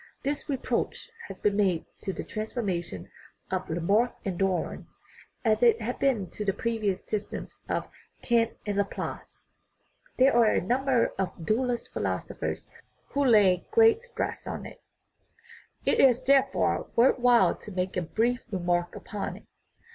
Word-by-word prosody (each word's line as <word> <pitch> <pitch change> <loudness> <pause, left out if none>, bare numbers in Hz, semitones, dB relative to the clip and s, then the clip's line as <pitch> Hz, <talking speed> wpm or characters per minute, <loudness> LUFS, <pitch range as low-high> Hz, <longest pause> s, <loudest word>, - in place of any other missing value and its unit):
This 285 +2 -3
reproach 280 - -2 0.2
has - - -9
been 205 -1 +1
made 190 -5 +1
to 195 - -3
the - - -5
transformism 210 -6 -4 0.4
of 185 -1 -2
La 165 +2 -1
marck 210 +8 +2
and 185 -3 -3
Darwin, 195 -2 -1 0.6
as 215 0 +3
it 235 -2 +5
had 235 +3 -4
been 235 -9 +1
to 210 - -5
the 195 -2 +1
previous 220 -4 -1
systems 210 -1 -5
of - - -1 0.4
Kant 230 -1 +2
and 205 -1 -2
Laplace; 200 -1 -4 0.7
there 260 0 +5
are 235 -2 +6
a - - +2
number 255 +4 +1
of 180 -3 -3
dualist 240 +3 -1
philosophers - - -3 0.4
who 285 - 0
lay 205 -8 +4
great 450 0 +5
stress 485 0 -4
on - - -5
it. - - -11 1.0
It - - +2
is, 250 -3 +6
therefore, 270 0 +2
worth 250 +3 +4
while 245 -1 +5
to 210 - -10
make 185 0 -2
a 180 - 0
brief 230 +8 0
remark 175 -2 -1
upon 210 -3 -5
it. - - -17
220 Hz, 150 wpm, -28 LUFS, 190-245 Hz, 1.0 s, are